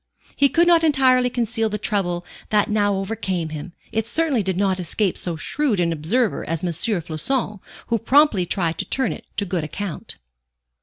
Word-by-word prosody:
He 280 - +4
could 340 +4 +4
not 340 -1 +5
entirely 260 -5 +4
conceal 230 -2 -1
the 210 - -2
trouble 180 -5 -1 0.2
that 210 -1 +2
now 205 -1 +2
overcame 190 -4 -2
him; 155 +2 -7 0.2
it 225 0 0
certainly 300 -2 +1
did 190 -2 -2
not 190 -1 +1
escape 180 +2 0
so 175 -2 -3
shrewd 250 - -1
an 170 -1 +1
observer 205 +10 0
as 165 +1 -3
M. 175 - 0
Floçon, 195 - -1 0.3
who 230 -1 0
promptly 235 - +4
tried 170 -4 -1
to - - -1
turn 265 - 0
it - - -11
to 200 - 0
good 175 -3 -2
account. 170 +3 -5
205 Hz, 175 wpm, -22 LUFS, 175-245 Hz, 0.3 s, not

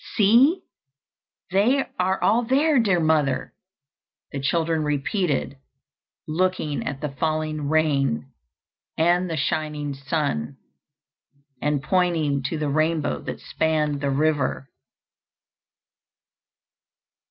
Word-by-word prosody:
"See, 250 - +4 0.9
they 235 +9 +3
are 190 +1 +1
all 225 +4 +4
there, 275 +4 +3
dear 195 -6 +2
mother," 155 -5 +1 0.8
the 140 - -4
children 160 +3 0
repeated, 145 0 -1 0.7
looking 160 -2 -1
at 140 0 -4
the 150 - -2
falling 155 +1 -2
rain 140 - +1 0.7
and 175 +2 +2
the 165 - -2
shining 150 0 -2
sun, 135 - -2 1.0
and 145 -1 0
pointing 165 -5 +1
to 165 - -3
the 150 -1 -2
rainbow 155 - 0
that - - -6
spanned 150 -2 -1
the 140 - 0
river. 140 -1 0
155 Hz, 95 wpm, -24 LUFS, 145-180 Hz, 1.0 s, See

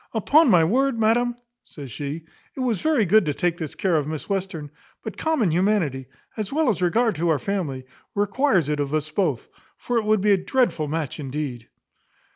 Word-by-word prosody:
Upon 280 - +4
my 175 -6 +6
word, 250 +7 +1
madam," 235 +2 +2 0.3
says 140 -5 -10
she, 145 +6 -5 0.3
"it - - -8
was 240 -5 0
very 305 -9 +2
good 215 +4 +5
to 145 - -1
take 175 -2 -1
this 160 -4 -5
care 185 -3 +1
of 150 -2 -1
Miss 155 -1 -5
Western; 185 -7 -3 0.3
but - - -6
common 300 - +1
humanity, 165 -8 0 0.3
as 215 -3 -4
well 305 -1 +2
as 200 -4 -1
regard 220 +6 +2
to 170 +2 0
our 160 - +3
family, 145 -7 -3 0.3
requires 205 - +2
it 150 -1 -1
of 145 +1 -1
us 155 0 -2
both; 155 - -1 0.3
for 245 -1 -1
it 220 - -4
would 215 -2 +2
be 210 +1 +3
a 200 - +5
dreadful 190 - 0
match 155 -2 -3
indeed." 135 -4 -5
185 Hz, 195 wpm, -23 LUFS, 150-225 Hz, 0.3 s, my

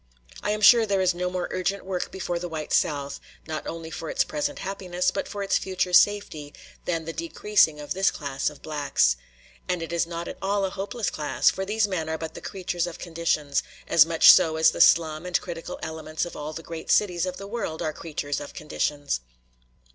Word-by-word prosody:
I - - -2
am 210 0 -1
sure 225 +2 +7
there 200 -1 +1
is 185 -1 +3
no 180 +1 -2
more 180 -1 -2
urgent 190 +2 -2
work 185 -2 -3
before 175 -2 -3
the 175 0 -5
white 155 -2 -4
South, 140 -2 0 0.3
not 155 -1 -5
only 165 -1 -6
for 160 0 -5
its - - +2
present 290 -1 -3
happiness, 180 -2 -2
but - - -3
for 200 -1 -4
its 195 - +2
future 185 -1 -2
safety, 180 -8 +3 0.3
than 165 -2 -1
the 165 - -5
decreasing 210 - +2
of 145 +4 -4
this 190 +1 +3
class 140 -2 -2
of 150 - -15
blacks. 145 - +2 0.5
And 180 -2 0
it 165 +1 -6
is 170 0 +1
not 170 0 -5
at - - -7
all 200 0 +1
a 190 - -3
hopeless 205 +3 -3
class; 150 -1 +2
for 190 - -4
these 210 +1 +1
men 165 -5 -2
are 160 - -1
but 160 0 -6
the - - -9
creatures 175 -2 -3
of 170 - -7
conditions, 160 -4 -1 0.3
as 160 - +7
much 165 0 +8
so 165 -4 +4
as 160 0 +5
the - - -2
slum 160 -1 +5
and 180 0 0
criminal 170 -2 -7
elements 160 0 -3
of 175 - -9
all 150 +1 -5
the 165 - -7
great 165 0 -8
cities 180 -3 +2
of 185 - -4
the 200 - -8
world 200 -7 -4
are 155 - -1
creatures 145 -3 -4
of 145 - -9
conditions. 145 - -2
170 Hz, 215 wpm, -25 LUFS, 155-190 Hz, 0.5 s, much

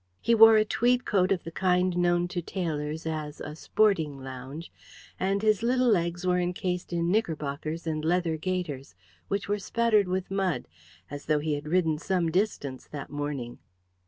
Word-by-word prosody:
He 235 - +2
wore 225 0 +9
a 215 - +4
tweed 245 +3 +1
coat 185 -1 +2
of 185 -3 +1
the 165 - -7
kind 180 0 +1
known 175 0 +2
to 175 -1 -3
tailors 160 -3 -3
as 155 -2 -4
"a 150 - -6
sporting 160 -6 +1
lounge," 135 +5 -8 0.5
and 195 +2 0
his 215 -1 +3
little 250 +1 +2
legs 175 -3 +1
were 180 0 +2
encased 180 0 -2
in 170 0 0
knickerbockers 160 -5 -2
and 155 -1 -2
leather 170 0 +1
gaiters, 155 -5 -4 0.3
which 200 0 -2
were 205 0 0
spattered 215 -1 +2
with 185 +1 -2
mud, 195 -3 -1 0.4
as 145 0 -7
though 155 -1 +3
he 150 +1 -1
had 145 +1 -4
ridden 160 -2 +1
some 175 -1 0
distance 160 -8 -2
that 145 -2 -8
morning. 145 -5 -4
175 Hz, 170 wpm, -27 LUFS, 155-195 Hz, 0.5 s, wore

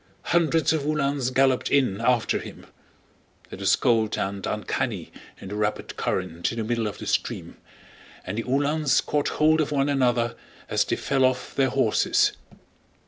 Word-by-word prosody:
Hundreds 165 -3 +3
of 160 - 0
Uhlans 140 -3 0
galloped 130 0 +2
in 125 -8 +2
after 125 -2 +2
him. - - -10 0.9
It - - -8
was - - +3
cold 110 -2 +1
and 100 0 -3
uncanny 105 -2 -3 0.3
in 95 - -9
the 105 - -5
rapid 105 0 -2
current 85 -2 -2
in 115 - -7
the 115 - -1
middle 115 0 -1
of 105 - -6
the - - -8
stream, - - -2 0.7
and 100 +5 -3
the - - -2
Uhlans 145 +2 +2
caught 145 -1 -1
hold 155 +1 +3
of 150 - -2
one 140 -1 +1
another 120 -4 +1 0.3
as - - +1
they - - -1
fell 135 -1 0
off 130 0 0
their 135 -1 +2
horses. 120 -4 +2
130 Hz, 165 wpm, -25 LUFS, 110-140 Hz, 0.9 s, Hundreds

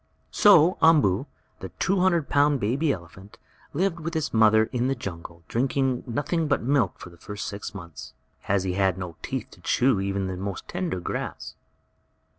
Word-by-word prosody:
So 185 -4 +5
Umboo, 145 - +4 0.3
the 95 - -7
two 195 0 +1
hundred 175 -5 +2
pound 145 -1 +3
baby 135 +8 +1
elephant, 95 +2 -9 0.3
lived 175 +2 -1
with 165 +1 -5
his 155 -1 -2
mother 110 -1 +5
in 125 0 0
the 135 - 0
jungle, 85 -6 -8
drinking 130 +1 0
nothing 150 +6 -1
but 140 - 0
milk 130 -6 +1
for 90 - -11
the 85 - -17
first 105 +3 -7
six 100 0 -6
months, 85 -5 -9 0.3
as 95 -1 +1
he 95 -1 -2
had 95 -1 +1
no 90 -3 -6
teeth - - -5
to - - -17
chew 125 -5 +2
even 100 0 -2
the 95 -1 -4
most 95 0 -5
tender 175 - -3
grass. 90 - -5
115 Hz, 175 wpm, -25 LUFS, 95-150 Hz, 0.3 s, So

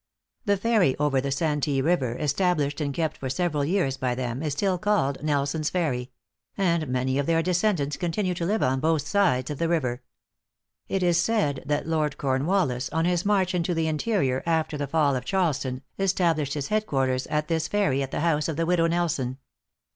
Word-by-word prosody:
The 200 -2 +2
ferry 205 - +2
over 140 -3 +1
the 140 - -3
Santee 145 -1 0
River, 135 -5 +1
established 150 -1 0
and 145 -1 -1
kept 160 +2 -2
for 130 - -4
several 150 0 0
years 145 -4 0
by 125 -2 -1
them, 125 0 -3
is 150 -3 -1
still 185 +4 0
called 200 -9 +1
Nelson's 150 +1 0
Ferry; 135 -9 -1 0.5
and 170 -5 +1
many 130 +1 0
of 140 - -1
their 165 0 +2
descendants 180 -5 0
continue 180 +2 -1
to 170 -1 -3
live 215 +3 +1
on 130 +1 +1
both 155 0 +1
sides 140 -11 +2
of 145 - -5
the 165 - 0
river. 130 -7 0 0.9
It 190 -1 -1
is 175 -1 +3
said 175 -11 0
that 145 0 0
Lord 155 -2 -1
Cornwallis, 135 -1 0
on 160 +1 0
his 180 +1 +1
march 190 -3 +2
into 175 0 0
the 165 0 0
interior, 155 - 0
after 160 -2 0
the 145 -1 -3
fall 145 -1 +2
of 125 - -3
Charleston, 140 -6 -1 0.2
established 170 -7 +1
his 145 -2 -3
head 215 0 0
quarters 130 -1 0
at 150 0 -1
this 165 -1 0
ferry, 195 -10 +1
at 135 - -3
the - - -3
house 155 -3 +1
of 160 - -2
the 165 +2 0
widow 170 -1 +2
Nelson. 160 -7 -1
155 Hz, 190 wpm, -26 LUFS, 135-175 Hz, 0.9 s, is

